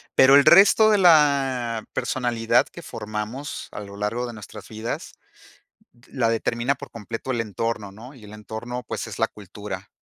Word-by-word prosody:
pero 130 +1 +7
el 140 - +6
resto 205 +4 +7
de 210 - +4
la 135 - +3
personalidad 125 -4 +1
que - - -11
formamos 110 +6 -6
a - - -7
lo 100 -1 -10
largo 105 +4 -2
de 120 - -7
nuestras 105 -1 -11
vidas, 110 +1 -6 0.9
la 120 -4 0
determina 115 +3 0
por - - -11
completo 115 +3 -6
el 120 -3 0
entorno, 110 -1 -4
¿no? 115 +7 -12
Y 125 -6 -16
el 105 - -12
entorno, 110 +3 -7
pues, - - -4
es - - -8
la - - +2
cultura 105 0 -9
115 Hz, 170 wpm, -23 LUFS, 105-130 Hz, 0.9 s, pero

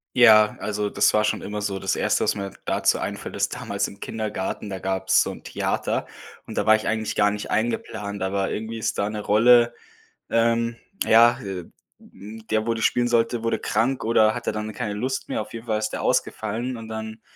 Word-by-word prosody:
Ja, 110 -3 +6
also 105 0 -2
das - - +3
war 105 0 +3
schon 105 - 0
immer 105 0 -5
so. 100 -2 -2
Das 95 0 -1
1., - - +1
was - - +2
mir 100 -1 -4
dazu - - +2
einfällt, - - -5
ist - - 0
damals - - -2
im 100 - -13
Kindergarten, 105 -2 -4
da 95 -1 -5
gab's 95 0 +2
so - - -1
'n - - -11
Theater - - -2 0.4
und - - -8
da 105 - +1
war 110 0 +7
ich 110 - -3
eigentlich 110 -1 -1
gar 105 0 +4
nicht 105 0 -5
eingeplant, 105 -2 -2
aber 95 0 -1
irgendwie 110 +1 -4
ist - - -2
da 100 +1 0
'ne 105 -1 -4
Rolle 120 +3 +5 0.6
ähm 115 0 +1 0.3
ja, 120 +2 +6
äh, 95 -4 -5 0.3
ähm, 110 +2 -12
der, 110 0 +1
wo 115 - +2
die 115 - -4
spielen 120 0 +2
sollte, 115 0 +1
wurde 115 - +1
krank, 120 +5 0
oder 110 -1 +4
hatte 120 - -2
dann 110 0 -4
keine 105 -2 -4
Lust 130 +6 -3
mehr. - - -1
Auf 105 - -9
jeden 115 +1 -7
Fall 110 -2 0
ist 110 0 -1
der - - -5
ausgefallen 120 +4 -1
und 115 -1 -9
dann, 110 0 -6
110 Hz, 210 wpm, -24 LUFS, 105-115 Hz, 0.6 s, war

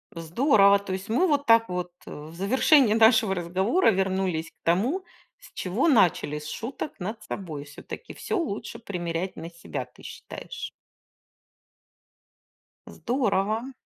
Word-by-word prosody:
Здорово! 200 - +4
То 200 -1 -5
есть 190 +3 -5
мы 265 +12 +3
вот 290 -3 +1
так 230 -1 +5
вот, 180 0 -3
э, - - -10
в 155 +3 -9
завершении 250 - +4
нашего 220 -2 +5
разговора 190 - +2
вернулись 190 -4 0
к - - -48
тому, 235 - +1 0.4
с - - -16
чего 195 - 0
начали- 175 - +3
с 150 - -9
шуток 245 - -6
над 215 +4 -5
собой. 160 -9 -6
Всё-таки 145 - -10
всё 430 -1 -3
лучше 230 - -4
примерять 180 -4 -4
на 165 +1 -7
себя, 170 0 -6
ты - - -20
считаешь? - - -8 2.2
Здорово! 240 0 -1
200 Hz, 135 wpm, -26 LUFS, 175-245 Hz, 2.2 s, так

